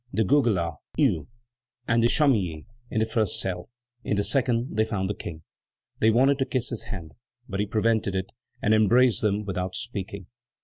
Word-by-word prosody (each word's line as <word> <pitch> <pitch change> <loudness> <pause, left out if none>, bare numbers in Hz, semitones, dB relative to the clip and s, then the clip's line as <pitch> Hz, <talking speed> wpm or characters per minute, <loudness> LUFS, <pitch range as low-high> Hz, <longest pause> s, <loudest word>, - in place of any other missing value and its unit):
de 110 - +1
Goguelat, 95 - +2 0.2
Hue, 75 - +2 0.6
and 115 0 +3
de 115 - +5
Chamilly 100 - +2 0.2
in - - -4
the 110 - +3
first 110 -4 +1
cell; 90 0 -3 0.3
in 105 - -1
the 100 - +2
second 125 -2 +1
they 110 - +3
found 100 -4 -2
the 100 - -1
King. 80 -4 -8 0.6
They 110 - +4
wanted 135 +5 +4
to 135 - +2
kiss 130 -2 -1
his 120 - -4
hand, 85 -6 -7 0.4
but 100 -2 -4
he 105 - 0
prevented 110 -2 +1
it, 95 0 -3 0.3
and 105 - +3
embraced 110 +1 +4
them 105 -1 0
without 95 -1 -3
speaking. 100 -4 -5
105 Hz, 180 wpm, -26 LUFS, 95-115 Hz, 0.6 s, de